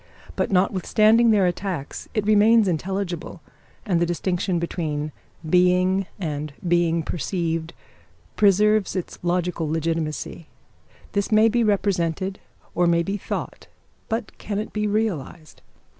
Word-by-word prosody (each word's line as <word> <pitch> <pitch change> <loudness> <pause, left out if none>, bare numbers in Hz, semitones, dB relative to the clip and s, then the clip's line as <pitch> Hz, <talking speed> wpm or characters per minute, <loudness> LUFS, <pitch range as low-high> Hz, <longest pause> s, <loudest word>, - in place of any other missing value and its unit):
But - - 0
notwithstanding 215 +5 +3
their 205 -4 +4
attacks 175 -5 -3
it 215 -2 0
remains 215 +1 +5
intelligible, 180 0 -3 0.5
and 180 -6 +1
the 175 - +2
distinction 180 +1 -1
between 155 -3 -3 0.4
being 180 +2 +3
and 150 -4 -3 0.2
being 170 -1 +2
perceived 165 -1 -3 0.6
preserves 210 0 +3
its 185 - -4
logical 175 -2 -1
legitimacy. 160 0 -3 0.6
This 200 +1 -1
may 215 +1 +5
be 235 +1 +2
represented, 190 -2 0 0.3
or 175 - +2
may 170 0 +3
be 195 +4 -2
thought; 205 - -5 0.4
but 225 -1 -3
can 205 -1 -4
it 215 - -4
be 210 0 0
realised? 180 -7 -3
180 Hz, 120 wpm, -23 LUFS, 170-205 Hz, 0.6 s, remains